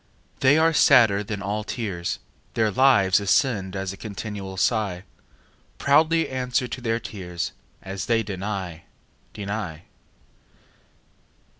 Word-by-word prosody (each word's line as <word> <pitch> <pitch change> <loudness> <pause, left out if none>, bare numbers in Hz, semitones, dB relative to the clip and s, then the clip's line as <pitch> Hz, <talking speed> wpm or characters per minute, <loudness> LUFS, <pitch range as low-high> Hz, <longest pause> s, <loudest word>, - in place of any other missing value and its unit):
They 135 +3 +5
are 165 +1 +4
sadder 115 -9 +5
than 100 -1 -5
all 105 +2 -2
tears; 100 -6 -3 0.4
Their 110 -2 +2
lives 105 -6 +4
ascend 100 -2 +1
as 95 0 -3
a - - -11
continual 100 -2 -6
sigh. 100 -3 0 0.7
Proudly 160 +3 +3
answer 125 0 -1
to 125 +1 -6
their 115 -1 0
tears: 90 -6 -5 0.3
As 95 0 -5
they 115 -1 +2
deny, 95 -4 -5 0.5
deny. 100 -6 -5
105 Hz, 115 wpm, -24 LUFS, 95-125 Hz, 0.7 s, They